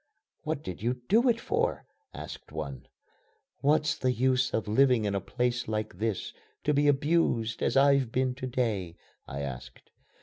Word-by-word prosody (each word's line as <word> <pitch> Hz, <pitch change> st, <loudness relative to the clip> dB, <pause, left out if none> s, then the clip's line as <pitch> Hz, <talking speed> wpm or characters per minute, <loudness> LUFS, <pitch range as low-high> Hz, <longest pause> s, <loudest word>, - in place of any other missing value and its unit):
"What -, -, -3 dB
did 90 Hz, 0 st, -6 dB
you 120 Hz, +3 st, 0 dB
do 235 Hz, +4 st, +5 dB
it 230 Hz, -1 st, +2 dB
for?" -, -, -1 dB, 0.3 s
asked -, -, -9 dB
one. 70 Hz, -4 st, -6 dB, 0.7 s
"What's 150 Hz, +1 st, +2 dB
the 130 Hz, -, 0 dB
use 130 Hz, +1 st, +2 dB
of 110 Hz, -, -1 dB
living 125 Hz, 0 st, +4 dB
in 100 Hz, -, 0 dB
a 100 Hz, -, -1 dB
place 120 Hz, +3 st, -1 dB
like 110 Hz, -4 st, -3 dB
this, 110 Hz, -3 st, -2 dB, 0.3 s
to 150 Hz, -, +2 dB
be 145 Hz, +1 st, +3 dB
abused 140 Hz, -6 st, +2 dB
as 130 Hz, -, +1 dB
I've 140 Hz, -3 st, +4 dB
been 130 Hz, 0 st, +1 dB
to 130 Hz, 0 st, -5 dB
day?" 110 Hz, -9 st, -1 dB, 0.3 s
I 70 Hz, +1 st, -5 dB
asked. 65 Hz, -3 st, -8 dB
125 Hz, 165 wpm, -29 LUFS, 105-135 Hz, 0.7 s, do